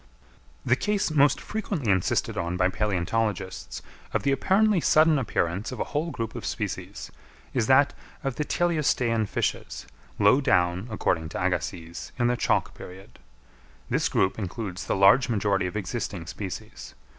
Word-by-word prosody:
The 120 - +4
case 205 +3 0
most 145 -2 +4
frequently 195 - -2
insisted 95 -2 +1
on 85 +1 -2
by 90 +1 +3
palæontologists 95 0 -2 0.3
of - - +1
the 140 - +2
apparently 195 +6 +3
sudden 155 -1 +4
appearance 95 -4 -1
of 130 - -7
a - - +1
whole 155 +3 0
group 115 -7 -4
of - - -7
species, - - -5 0.4
is 120 -4 +1
that 140 +2 +5 0.3
of 135 -3 -2
the 150 - 0
teleostean 135 -10 +1
fishes, - - -3 0.3
low 105 +7 +5
down, 90 -5 +1
according 80 -6 -1
to - - -5
Agassiz, 85 -1 -3
in 120 - +1
the 120 +1 +2
Chalk - - 0
period. 95 +2 -12 0.7
This - - +1
group 95 +3 +1
includes 95 -1 -5
the - - +1
large 100 +7 +5
majority 100 -4 +1
of 90 - -4
existing 100 -3 -4
species. 90 +1 -7
110 Hz, 150 wpm, -26 LUFS, 95-140 Hz, 0.7 s, that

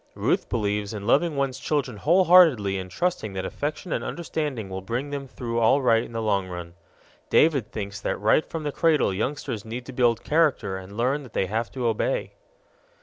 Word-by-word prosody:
Ruth - - 0
believes 105 -1 -1
in 100 -1 -6
loving 150 +7 +2
one's 135 -2 -1
children 135 -8 -1
wholeheartedly 160 - +5
and 95 0 -7
trusting 110 - -2
that 95 -1 -3
affection 155 +4 -4
and - - -2
understanding 150 - -3
will 95 0 -5
bring 120 +9 -3
them 140 -1 -4
through 120 -2 -3
all 115 +5 +4
right 115 -4 +3
in - - -8
the 115 -1 -3
long 100 -3 +1
run; 90 -1 -7 0.6
David 140 -8 +3
thinks 100 -1 -5
that - - -1
right 110 +9 +3
from 165 -1 -6
the 145 - -2
cradle 155 - +2
youngsters 125 +1 -3
need 120 +2 -6
to 130 - -9
build 120 -2 +2
character 150 -11 +1
and 95 0 -8
to 100 - -11
learn 130 +6 0
that 125 -5 -13
they - - +1
have 110 +4 -2
to 130 -2 -3
obey. 115 - -1
120 Hz, 200 wpm, -25 LUFS, 105-145 Hz, 0.6 s, wholeheartedly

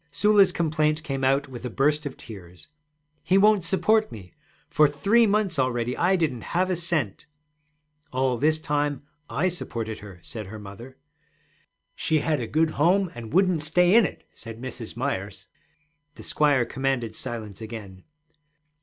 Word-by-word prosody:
Sula's 210 -2 +4
complaint 155 -1 0
came 135 -2 -3
out 135 +2 +2
with 125 -3 -9
a 125 - -3
burst 150 +5 +1
of 135 - -9
tears. 90 - -12 0.5
'He 175 +5 +2
won't 210 -1 +4
support 215 +5 +2
me. 90 -5 -11 0.3
For 150 - +4
three 205 +11 +3
months 200 -6 +1
already 125 -1 0
I 180 +3 +2
didn't 155 -9 -1 0.2
have 185 +1 +2
a - - +1
cent.' 160 - -1 0.8
'All 130 -2 0
this 155 +2 +3
time 145 -2 -1 0.3
I 170 +6 0
supported 115 -11 -4
her,' 100 -4 -11
said 110 -4 -7
her 110 +3 -8
mother. 110 +6 -11 1.0
'She 160 -1 0
had 150 -1 0
a 115 - -4
good 160 +4 +1
home 180 +4 +2
and 115 -2 -9
wouldn't 185 -1 +3
stay 175 +4 +3
in 230 -1 +6
it,' - - -13
said 115 -1 -10
Mrs. 120 -2 -7
Myers. 120 -7 -4 0.7
The - - -11
squire 145 -5 +2
commanded 130 -4 -2
silence 115 -5 -6
again. 105 -4 -9
145 Hz, 155 wpm, -25 LUFS, 115-170 Hz, 1.0 s, in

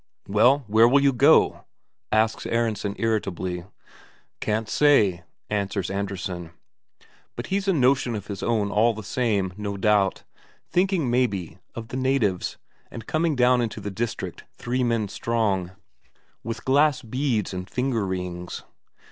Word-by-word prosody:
"Well, 125 +8 +4
where 110 +2 +5
will 140 +3 +4
you 140 -1 +4
go?" 120 - +4 0.5
asks 110 +1 +1
Aronsen 110 -3 -1
irritably. 95 -5 -2 0.7
"Can't 110 +1 -1
say," 110 -9 +3 0.3
answers 100 -2 -2
Andresen. 95 -4 -4 0.8
But 120 - -5
he's 200 0 0
a 195 - +4
notion 130 -4 +2
of 100 -2 -5
his 100 -2 -6
own 105 -4 0
all 115 +2 +3
the 110 - -7
same, 100 -6 0
no 100 -1 -4
doubt; 105 -1 +2 0.5
thinking, 180 -6 +1
maybe, 100 -9 -1 0.2
of 115 -1 -7
the 125 - -4
natives, 130 -9 0 0.3
and 115 - -9
coming 155 -1 0
down 125 -1 +4
into 115 -2 -3
the 100 - -5
district 115 +4 -4
three 125 +1 -2
men 115 -3 0
strong, 100 -4 -1 0.7
with 115 +2 -5
glass 145 +1 +3
beads 120 -4 -1
and 90 0 -6
finger 125 -4 -1
rings. 90 -2 -5
110 Hz, 140 wpm, -24 LUFS, 100-125 Hz, 0.8 s, where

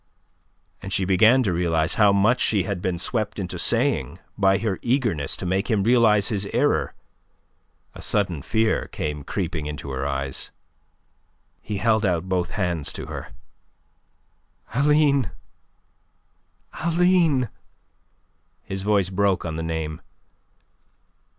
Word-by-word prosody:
As 95 - -7
she 95 -1 0
began 110 +8 +5
to 95 -6 0
realize 85 -1 +1
how 105 -2 +5
much 105 +5 +3
she 100 -4 +2
had 95 -2 -4
been 90 -1 -1
swept 110 +4 -2
into 90 -3 -4
saying 120 -4 +1 0.2
by 95 -1 +3
her 105 -4 -2
eagerness 115 - 0
to - - -6
make 95 +5 -1
him 105 -4 +2
realize 110 -3 +4
his 100 -3 -2
error, - - 0 1.0
a - - -11
sudden 95 -8 0
fear 110 - 0
came 75 -1 -4
creeping 85 -2 -3
into 75 -2 -6
her 65 +1 -2
eyes. 70 -1 -2 1.1
He 105 - -4
held 110 +1 +2
out 90 -2 0
both 90 -2 -1
hands 90 -6 0
to - - -6
her. - - -7 1.4
"Aline! 140 - +3 1.5
Aline!" 170 - +3 1.1
His 95 0 -4
voice 100 -2 +1
broke 95 -1 +1
on 80 -2 -3
the 80 - -3
name. 80 -1 -4
95 Hz, 125 wpm, -23 LUFS, 85-115 Hz, 1.5 s, began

